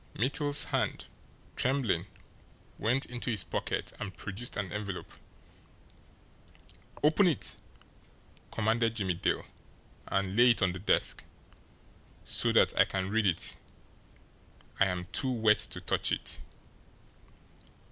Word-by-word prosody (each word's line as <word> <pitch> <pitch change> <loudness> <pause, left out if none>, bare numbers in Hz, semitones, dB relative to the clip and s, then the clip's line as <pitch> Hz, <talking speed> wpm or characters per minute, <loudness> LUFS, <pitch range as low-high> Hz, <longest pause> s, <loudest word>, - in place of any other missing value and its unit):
Mittel's 145 +5 +4
hand, - - -1 0.5
trembling, 120 -9 0 0.7
went 125 +5 +1
into 125 0 -4
his 105 -5 +2
pocket - - -3
and 100 -3 -6
produced 105 +5 -4
an 100 -4 -3
envelope. 100 -3 -5 1.9
"Open 160 +6 +5
it!" 160 -8 0 0.9
commanded 115 +1 +1
Jimmie 95 -5 0
Dale. 85 - -1 0.6
"And 100 0 -1
lay 120 +2 +6
it 115 -3 +3
on 90 - +3
the 95 - -6
desk, 100 - +1 1.0
so - - +1
that - - +4
I - - +7
can 95 0 -3
read 110 -1 +2
it 85 - 0 1.2
I 100 - +5
am 90 -1 -3
too 130 - +4
wet 110 -3 +3
to - - -5
touch - - 0
it." - - -2
110 Hz, 115 wpm, -30 LUFS, 95-125 Hz, 1.9 s, I